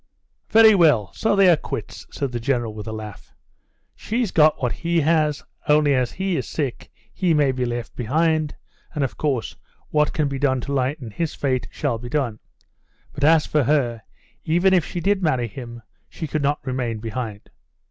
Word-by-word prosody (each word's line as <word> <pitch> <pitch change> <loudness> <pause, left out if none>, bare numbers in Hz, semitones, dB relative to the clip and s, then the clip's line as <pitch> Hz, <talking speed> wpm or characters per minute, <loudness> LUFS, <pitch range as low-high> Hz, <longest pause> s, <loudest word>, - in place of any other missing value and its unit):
"Very 220 0 +7
well; 150 - +4
so 220 - +1
they 195 -1 +5
are 175 - +7
quits," - - -7
said 140 -3 -3
the 120 - -3
General, 120 -2 -1
with 105 0 -8
a - - -4
laugh. 110 -2 -9 0.6
"She's 230 -2 -2
got 155 -1 +4
what 125 -3 0
he 170 -1 0
has, 155 -1 +1 0.2
only 150 -1 +4
as 125 -2 0
he 190 -1 -1
is - - -3
sick 140 -6 -4 0.2
he 175 -4 +1
may 145 -3 +3
be 130 -1 -2
left 120 -1 -4
behind, 155 +4 0 0.4
and 150 - 0
of 135 - -2
course 135 -7 -2 0.3
what 150 -1 +2
can 150 -2 0
be 140 -1 -4
done 130 -2 +2
to 140 - -4
lighten 130 -2 -2
his 165 +8 -3
fate 130 -7 -1
shall 115 - -2
be 120 +1 -8
done. 130 -7 -1 0.7
But 140 - -6
as 160 +1 +5
for 150 -4 +1
her, 120 -5 +1 0.4
even 175 +4 +3
if 180 -4 +4
she 175 - -5
did 200 +2 +1
marry 130 -8 +1
him, 120 +1 -9 0.3
she 165 - -6
could 155 0 -2
not 145 0 -1
remain 125 -4 -2
behind." 110 -1 -6
140 Hz, 190 wpm, -22 LUFS, 120-160 Hz, 0.7 s, Very